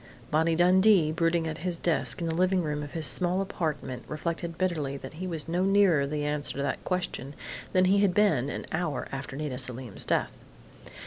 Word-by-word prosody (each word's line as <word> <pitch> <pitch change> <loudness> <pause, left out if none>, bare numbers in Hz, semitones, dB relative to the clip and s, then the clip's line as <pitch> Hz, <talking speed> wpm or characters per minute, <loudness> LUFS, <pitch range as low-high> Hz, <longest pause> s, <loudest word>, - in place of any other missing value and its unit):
_ - - -23
Bonnie 160 +2 +3
Dundee, 180 -1 +5
brooding 165 0 +1
at 160 0 -4
his 175 0 -2
desk 140 -6 0
in - - -1
the 165 - -1
living 185 +1 +2
room 150 -1 -2
of 145 0 -7
his 160 -2 -1
small 180 +4 +2
apartment, 155 -9 -3
reflected 170 +1 -4
bitterly 155 -7 -1
that - - -9
he 185 - -2
was 165 -3 -5
no 175 +2 0
nearer 190 -7 +4
the 150 0 -2
answer 150 0 -1
to 140 - -2
that 140 - -2
question 175 -6 -3 0.4
than 185 0 +4
he 195 +2 +4
had 195 -3 +2
been 155 -11 +3
an - - -5
hour 160 -4 -2
after 135 0 -5
Nita 140 -3 -3
Selim's 125 -4 -4
death. - - 0
160 Hz, 200 wpm, -28 LUFS, 145-180 Hz, 0.4 s, Dundee